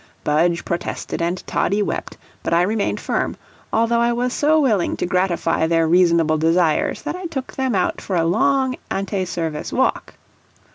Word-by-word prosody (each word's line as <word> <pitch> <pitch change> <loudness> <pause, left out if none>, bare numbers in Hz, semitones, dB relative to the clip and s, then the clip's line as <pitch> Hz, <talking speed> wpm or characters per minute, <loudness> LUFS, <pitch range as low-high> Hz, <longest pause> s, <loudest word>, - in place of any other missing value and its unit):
Budge 170 +3 +1
protested 170 0 -3
and 175 +2 -2
Toddie 205 +1 0
wept, - - -4 0.2
but - - 0
I 170 - +4
remained 210 +2 -1
firm, - - -2 0.3
although 230 +1 +2
I 235 0 +2
was 245 +1 -1
so 310 +2 +3
willing 220 - +1
to - - -1
gratify 180 -3 +1
their 165 -1 +2
reasonable 170 -2 +3
desires 165 0 +1
that - - -3
I 365 -1 -5
took 270 -6 -5
them 260 -4 -1
out 185 - 0
for 190 - -3
a 165 -1 +2
long 265 +8 +2
ante 195 -1 -2
service 165 -4 -4
walk. - - 0
185 Hz, 170 wpm, -20 LUFS, 170-235 Hz, 0.3 s, I